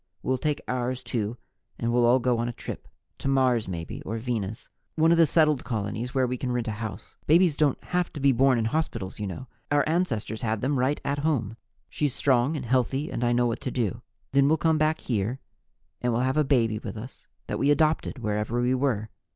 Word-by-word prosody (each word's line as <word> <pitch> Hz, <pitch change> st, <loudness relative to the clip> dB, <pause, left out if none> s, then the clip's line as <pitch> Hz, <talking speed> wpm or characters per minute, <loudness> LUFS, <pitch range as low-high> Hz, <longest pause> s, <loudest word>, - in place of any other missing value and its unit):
We'll 130 Hz, -1 st, 0 dB
take 150 Hz, 0 st, -1 dB
ours, 125 Hz, 0 st, -2 dB
too, 115 Hz, -1 st, -2 dB, 0.4 s
and 115 Hz, 0 st, -1 dB
we'll 120 Hz, -1 st, +4 dB
all 125 Hz, +2 st, +6 dB
go 125 Hz, -2 st, +1 dB
on 120 Hz, +1 st, -1 dB
a -, -, -5 dB
trip -, -, -7 dB, 0.3 s
to -, -, -4 dB
Mars, 130 Hz, -4 st, +2 dB
maybe, 85 Hz, -3 st, -5 dB
or 110 Hz, +3 st, -4 dB
Venus 110 Hz, -3 st, -3 dB, 0.3 s
one 160 Hz, +1 st, +4 dB
of 170 Hz, -, +4 dB
the 165 Hz, -, +6 dB
settled 150 Hz, -3 st, +3 dB
colonies 110 Hz, +2 st, -3 dB
where 130 Hz, -1 st, +2 dB
we 125 Hz, 0 st, -2 dB
can 125 Hz, 0 st, -3 dB
rent 120 Hz, -2 st, -1 dB
a -, -, 0 dB
house. 110 Hz, -4 st, -7 dB
Babies 170 Hz, 0 st, +5 dB
don't 145 Hz, -3 st, +2 dB
have 180 Hz, 0 st, -1 dB
to 150 Hz, -, -6 dB
be 140 Hz, 0 st, +4 dB
born 130 Hz, 0 st, +4 dB
in 115 Hz, -, 0 dB
hospitals, 115 Hz, -9 st, -2 dB
you 105 Hz, -, -2 dB
know; 95 Hz, +7 st, -6 dB, 0.2 s
our 145 Hz, 0 st, +2 dB
ancestors 140 Hz, -, -1 dB
had 110 Hz, -2 st, -1 dB
them 135 Hz, +1 st, 0 dB
right 130 Hz, +4 st, +1 dB
at 145 Hz, +1 st, 0 dB
home. 135 Hz, -8 st, 0 dB, 0.3 s
She's 145 Hz, -3 st, -1 dB
strong 135 Hz, +3 st, +2 dB
and 130 Hz, -, -5 dB
healthy 130 Hz, +4 st, 0 dB
and 120 Hz, -, -2 dB
I 120 Hz, -, +2 dB
know 120 Hz, 0 st, +3 dB
what 115 Hz, -1 st, -1 dB
to -, -, -3 dB
do. 120 Hz, -7 st, -2 dB, 0.3 s
Then 140 Hz, +1 st, +4 dB
we'll 160 Hz, +2 st, +4 dB
come 160 Hz, 0 st, +2 dB
back 155 Hz, +1 st, +1 dB
here 115 Hz, +2 st, -1 dB, 0.6 s
and 125 Hz, -, +1 dB
we'll 120 Hz, +2 st, +1 dB
have 130 Hz, +1 st, +1 dB
a 155 Hz, -, +4 dB
baby 115 Hz, -6 st, +2 dB
with 115 Hz, -, -7 dB
us 120 Hz, +5 st, -10 dB, 0.2 s
that -, -, -3 dB
we 140 Hz, -, +2 dB
adopted 155 Hz, 0 st, +2 dB
wherever 105 Hz, 0 st, -1 dB
we 125 Hz, +1 st, +2 dB
were. 125 Hz, -5 st, 0 dB
125 Hz, 225 wpm, -26 LUFS, 115-145 Hz, 0.6 s, all